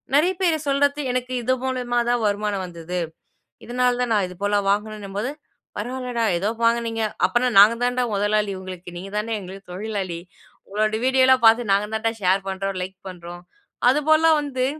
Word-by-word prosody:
நிறைய 340 Hz, +6 st, +4 dB
பேர் 340 Hz, -4 st, +3 dB
சொல்றது, 285 Hz, +1 st, +2 dB
எனக்கு 250 Hz, 0 st, -3 dB
இது 255 Hz, +3 st, +2 dB
மூலயமா 250 Hz, -2 st, -1 dB
தான் 240 Hz, -1 st, +1 dB
வருமானம் 205 Hz, -1 st, -1 dB
வந்துது. 175 Hz, 0 st, -5 dB, 0.7 s
இதனால 250 Hz, +1 st, +1 dB
தான் 240 Hz, -2 st, 0 dB
நான் 205 Hz, -3 st, +2 dB
இது 180 Hz, -, -11 dB
போல 205 Hz, 0 st, +2 dB
வாங்குனேன்னும்போது, 210 Hz, +2 st, -2 dB, 0.5 s
"பரவால்லடா! 245 Hz, +1 st, -3 dB
எதோ 200 Hz, +5 st, 0 dB
வாங்குனீங்க, 230 Hz, -1 st, +1 dB, 0.2 s
அப்பன்னா 240 Hz, +6 st, +1 dB
நாங்க 215 Hz, +3 st, +7 dB
தான்டா 245 Hz, 0 st, +1 dB
முதலாளி 205 Hz, 0 st, +1 dB
உங்களுக்கு, 185 Hz, -2 st, -9 dB
நீங்க 195 Hz, +3 st, -9 dB
தான்டா 220 Hz, +2 st, -1 dB
எங்களுக்கு 190 Hz, 0 st, -11 dB
தொழிலாளி. 190 Hz, -4 st, -4 dB, 0.5 s
உங்களோட 215 Hz, +2 st, -1 dB
வீடியோலாம் 260 Hz, -1 st, +4 dB
பாத்து 225 Hz, -1 st, +4 dB
நாங்க 200 Hz, +1 st, +2 dB
தான்டா 225 Hz, +1 st, 0 dB
ஷேர் 190 Hz, +1 st, +2 dB
பண்றோம். 195 Hz, 0 st, -3 dB
லைக் 190 Hz, +1 st, -10 dB
பண்றோம்." 175 Hz, -1 st, -10 dB, 0.5 s
அது 280 Hz, +4 st, +2 dB
போல்லாம் 315 Hz, 0 st, +5 dB
வந்து 260 Hz, -3 st, -1 dB
215 Hz, 160 wpm, -23 LUFS, 195-250 Hz, 0.7 s, நாங்க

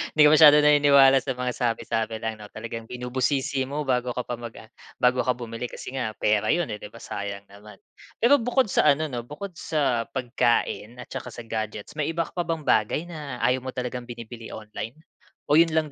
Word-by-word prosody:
hindi 155 Hz, -, +4 dB
ka 150 Hz, -, +8 dB
masyadong 150 Hz, -1 st, +8 dB
naniniwala 140 Hz, -2 st, +6 dB
sa 130 Hz, -2 st, -4 dB
mga 125 Hz, 0 st, -2 dB
sabi-sabi 115 Hz, -2 st, -1 dB
lang, 110 Hz, -1 st, -3 dB
'no, 105 Hz, -, -10 dB
talagang 115 Hz, +1 st, -7 dB
binubusisi 130 Hz, +2 st, -1 dB
mo 150 Hz, +2 st, -3 dB
bago 125 Hz, -2 st, -1 dB
ka 125 Hz, -, -2 dB
pa 120 Hz, -1 st, -5 dB
mag 120 Hz, -1 st, -8 dB
ah, 110 Hz, -, -13 dB, 0.2 s
bago 125 Hz, 0 st, +2 dB
ka 125 Hz, -, +2 dB
bumili 120 Hz, 0 st, -5 dB
kasi -, -, -8 dB
nga, 125 Hz, -5 st, -3 dB
pera 105 Hz, 0 st, +1 dB
'yon, 170 Hz, -10 st, -2 dB
eh, 105 Hz, -, -5 dB
'di 105 Hz, -, -8 dB
ba 115 Hz, +2 st, -14 dB
sayang 100 Hz, 0 st, -5 dB
naman. 105 Hz, 0 st, -13 dB, 0.5 s
Pero 280 Hz, +3 st, +6 dB
bukod 245 Hz, -1 st, +1 dB
sa -, -, +3 dB
ano 155 Hz, -1 st, -3 dB
'no, 120 Hz, -1 st, -5 dB
bukod 190 Hz, +6 st, -7 dB
sa 135 Hz, -7 st, 0 dB
pagkain 120 Hz, -2 st, 0 dB
at -, -, -22 dB
saka -, -, -6 dB
sa 120 Hz, -, -7 dB
gadgets, 110 Hz, -2 st, -5 dB
may 145 Hz, -, 0 dB
iba 165 Hz, +1 st, 0 dB
ka -, -, -12 dB
pa 175 Hz, -1 st, -3 dB
bang 165 Hz, -3 st, -2 dB
bagay 110 Hz, +8 st, +2 dB
na 150 Hz, -8 st, -7 dB
ayaw 125 Hz, +2 st, +3 dB
mo 130 Hz, 0 st, -7 dB
talagang 125 Hz, -1 st, -4 dB
binibili 115 Hz, -1 st, -9 dB
online? 110 Hz, +3 st, -7 dB, 0.6 s
O, 155 Hz, -, +7 dB
'yon 165 Hz, -1 st, +4 dB
lang 155 Hz, -2 st, +1 dB
125 Hz, 210 wpm, -25 LUFS, 115-150 Hz, 0.6 s, ka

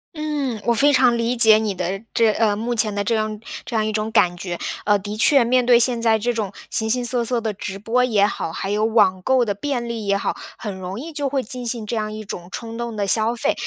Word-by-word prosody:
嗯， 290 Hz, -7 st, -3 dB
我 235 Hz, -, +3 dB
非 285 Hz, +5 st, +4 dB
常 255 Hz, -3 st, +4 dB
理 235 Hz, +1 st, -1 dB
解 220 Hz, -2 st, +8 dB
你 210 Hz, -3 st, -2 dB
的 185 Hz, +3 st, -3 dB
这 225 Hz, -2 st, +4 dB
呃， 210 Hz, -1 st, +1 dB
目 235 Hz, +3 st, -3 dB
前 215 Hz, -2 st, +2 dB
的 205 Hz, -, -1 dB
这 230 Hz, -, 0 dB
样 215 Hz, -1 st, -2 dB, 0.2 s
这 235 Hz, -, -6 dB
样 215 Hz, -1 st, +1 dB
一 215 Hz, -, -1 dB
种 215 Hz, +1 st, -2 dB
感 175 Hz, -3 st, +3 dB
觉。 175 Hz, -1 st, -5 dB, 0.3 s
呃， 205 Hz, 0 st, +4 dB
的 205 Hz, +2 st, -6 dB
确 240 Hz, +4 st, +4 dB
面 250 Hz, +1 st, +2 dB
对 240 Hz, -1 st, +5 dB
现 240 Hz, -1 st, +2 dB
在 225 Hz, -1 st, +3 dB
这 240 Hz, +3 st, -1 dB
种 210 Hz, -4 st, -3 dB, 0.2 s
形 220 Hz, 0 st, 0 dB
形 245 Hz, +1 st, +1 dB
色 240 Hz, -1 st, +1 dB
色 240 Hz, 0 st, -1 dB
的 220 Hz, -2 st, -3 dB
直 195 Hz, 0 st, -6 dB
播 235 Hz, +5 st, 0 dB
也 215 Hz, -5 st, +3 dB
好， 165 Hz, -5 st, -3 dB
还 195 Hz, +4 st, -4 dB
有 210 Hz, +1 st, 0 dB
网 205 Hz, -5 st, +3 dB
购 255 Hz, +2 st, +2 dB
的 205 Hz, -, -1 dB
便 245 Hz, +2 st, -3 dB
利 225 Hz, -3 st, -5 dB
也 200 Hz, 0 st, +2 dB
好， -, -, -2 dB, 0.2 s
很 205 Hz, -3 st, -6 dB
容 185 Hz, +4 st, -6 dB
易 320 Hz, +3 st, -8 dB
就 285 Hz, -2 st, -2 dB
会 270 Hz, -1 st, -1 dB
进 250 Hz, +2 st, -7 dB
行 225 Hz, -2 st, -1 dB
这 230 Hz, -, -3 dB
样 215 Hz, -1 st, -2 dB
一 215 Hz, 0 st, -7 dB
种 175 Hz, -3 st, -7 dB
冲 230 Hz, -1 st, -7 dB
动 235 Hz, -1 st, -5 dB
的 205 Hz, -1 st, -1 dB
消 225 Hz, +3 st, +2 dB
费。 -, -, 0 dB
220 Hz, 280 characters per minute, -21 LUFS, 210-240 Hz, 0.3 s, 解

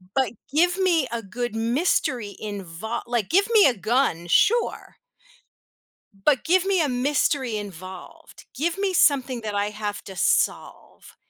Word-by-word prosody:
But 260 Hz, -5 st, +1 dB, 0.2 s
give 350 Hz, +4 st, +3 dB
me 340 Hz, -7 st, +2 dB
a 235 Hz, -, -3 dB
good 230 Hz, +3 st, -5 dB
mystery 235 Hz, -, 0 dB
invol 205 Hz, +2 st, -5 dB
like, 235 Hz, -5 st, -1 dB
give 390 Hz, +4 st, +3 dB
me 435 Hz, -3 st, +7 dB
a 250 Hz, -5 st, +2 dB
gun, 195 Hz, -4 st, 0 dB
sure. 425 Hz, -, +1 dB, 1.2 s
But 250 Hz, +8 st, +1 dB
give 365 Hz, +2 st, +3 dB
me 385 Hz, -2 st, +1 dB
a 295 Hz, -, 0 dB
mystery 260 Hz, -2 st, 0 dB
involved, 185 Hz, -2 st, -10 dB
give 330 Hz, +7 st, -1 dB
me 395 Hz, -1 st, 0 dB
something 265 Hz, -7 st, +2 dB
that 210 Hz, -1 st, -4 dB
I 205 Hz, +1 st, 0 dB
have 210 Hz, -1 st, -5 dB
to 190 Hz, -, -10 dB
solve. -, -, -1 dB
245 Hz, 145 wpm, -24 LUFS, 205-315 Hz, 1.2 s, me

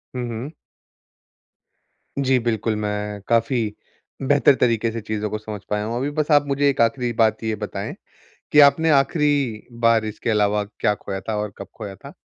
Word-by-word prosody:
हुँ, 125 Hz, -1 st, -3 dB
हुँ। 120 Hz, +6 st, -5 dB, 1.7 s
जी, 135 Hz, -1 st, +3 dB
बिल्कुल, 115 Hz, -1 st, -1 dB
मैं 105 Hz, -1 st, -3 dB
काफ़ी 115 Hz, +2 st, +2 dB, 0.7 s
बेहतर 145 Hz, -1 st, +5 dB
तरीके 115 Hz, -2 st, +1 dB
से 115 Hz, 0 st, -5 dB
चीज़ों 105 Hz, 0 st, -3 dB
को 110 Hz, -, -3 dB
समझ 105 Hz, -2 st, -7 dB
पाया 105 Hz, 0 st, -1 dB
हूँ। 115 Hz, +2 st, -3 dB
अभी 135 Hz, +3 st, -1 dB
बस 155 Hz, +1 st, 0 dB
आप 145 Hz, -1 st, +5 dB
मुझे 140 Hz, +1 st, +2 dB
एक 135 Hz, -, 0 dB
आखिरी 120 Hz, +1 st, +1 dB
बात 110 Hz, 0 st, +2 dB
ये 110 Hz, -1 st, -1 dB
बताएँ 105 Hz, -1 st, -5 dB, 0.6 s
कि 150 Hz, -, +7 dB
आपने 160 Hz, +3 st, +5 dB
आखिरी 140 Hz, -5 st, +1 dB, 0.2 s
बार 115 Hz, -1 st, +4 dB
इसके 110 Hz, +2 st, -3 dB
अलावा 105 Hz, -1 st, +2 dB
क्या 105 Hz, 0 st, -1 dB
खोया 95 Hz, -1 st, -6 dB
था 110 Hz, -, 0 dB
और 105 Hz, -1 st, -3 dB
कब -, -, -8 dB
खोया 105 Hz, -3 st, -7 dB
था? -, -, -12 dB
115 Hz, 175 wpm, -22 LUFS, 105-135 Hz, 1.7 s, कि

